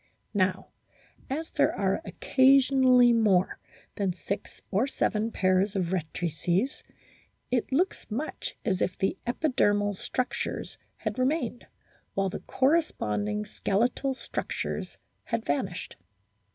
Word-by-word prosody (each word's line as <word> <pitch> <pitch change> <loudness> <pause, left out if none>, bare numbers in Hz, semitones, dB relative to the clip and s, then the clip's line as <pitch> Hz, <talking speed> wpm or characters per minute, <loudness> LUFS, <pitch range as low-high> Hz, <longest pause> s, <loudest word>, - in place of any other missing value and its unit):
Now 185 -2 +1 0.6
as 310 +5 -3
there - - +2
are - - 0
occasionally 260 -2 +5
more 200 -5 +3 0.4
than 195 -3 0
six 195 +3 -5
or 210 +7 +2
seven 225 -4 0
pairs 185 +1 +2
of 180 -3 0
rectrices, 175 - -1 0.7
it 245 +1 0
looks 350 +8 0
much 255 +9 -4
as 190 -4 0
if 180 - 0
the 195 - 0
epidermal 205 -7 +2
structures 250 +6 -3 0.2
had - - -3
remained 255 -2 0 0.5
while 195 0 +1
the - - -5
corresponding 105 - 0
skeletal 245 - 0
structures - - -4 0.3
had 230 -1 -2
vanished. 175 +5 -2
215 Hz, 110 wpm, -28 LUFS, 185-260 Hz, 0.7 s, occasionally